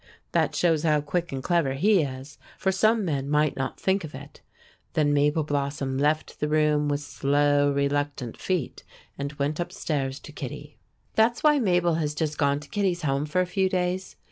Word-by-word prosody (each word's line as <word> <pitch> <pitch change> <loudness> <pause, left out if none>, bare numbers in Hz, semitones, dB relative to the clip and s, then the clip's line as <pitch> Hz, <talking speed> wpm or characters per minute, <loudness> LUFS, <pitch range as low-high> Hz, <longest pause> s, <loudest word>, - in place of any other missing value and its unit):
That - - +1
shows 165 -3 +2
how 155 -2 +3
quick 170 +4 -2
and 135 -1 -4
clever 170 -6 +1
he 195 +5 +4
is, 135 0 -6 0.2
for 190 - +1
some 215 +2 +2
men 140 -4 -2
might 150 0 +2
not 135 -1 -4
think 190 0 +1
of 150 -4 -8
it. 140 +2 -11 0.5
Then 145 -2 +2
Mabel 150 +2 +2
Blossom 140 -2 -2
left 150 +2 0
the 150 - 0
room, 150 -1 +2
with 145 0 -1
slow, 145 0 +2
reluctant 140 -3 -1
feet, 180 -8 -3 0.4
and 140 0 -3
went 145 +2 -2
up 175 - -3
stairs 135 -3 -2
to - - -11
Kittie. - - -8 0.3
That's 230 +2 +2
why 300 -1 +5
Mabel 175 -6 +2
has 150 -1 -2
just 150 0 -2
gone 140 -1 +2
to 150 - -13
Kittie's 190 -4 0
home 140 0 0
for 185 +5 +1
a - - +1
few 190 +1 0
days. 185 0 -2
150 Hz, 190 wpm, -26 LUFS, 140-175 Hz, 0.5 s, why